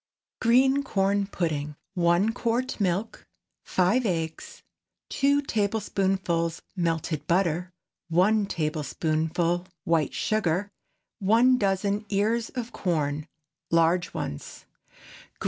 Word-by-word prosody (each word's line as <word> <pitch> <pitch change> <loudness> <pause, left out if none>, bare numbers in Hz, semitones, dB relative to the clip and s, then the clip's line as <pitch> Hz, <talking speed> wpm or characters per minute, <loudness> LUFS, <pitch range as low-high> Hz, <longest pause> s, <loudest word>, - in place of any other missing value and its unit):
GREEN 265 +4 +4
CORN 200 -5 +1
PUDDING. 160 -7 -2
✠ 150 - -10 0.2
1 175 +4 +2
quart 245 +2 -1
milk. 195 +4 -1 0.4
5 190 +8 +2
eggs. 165 -3 -4 0.5
2 280 +1 +2
tablespoonfuls 195 -6 -1
melted 165 -3 -1
butter. 180 0 +1 0.4
1 200 +5 +3
tablespoonful 160 +2 -1 0.2
white 165 -4 +1
sugar. 200 -2 0 0.5
1 235 +6 +4
dozen 200 +1 0
ears 220 +3 +1
of 245 -2 -5
corn—large 160 +1 -1
ones. 75 - -6
185 Hz, 90 wpm, -26 LUFS, 165-215 Hz, 0.5 s, GREEN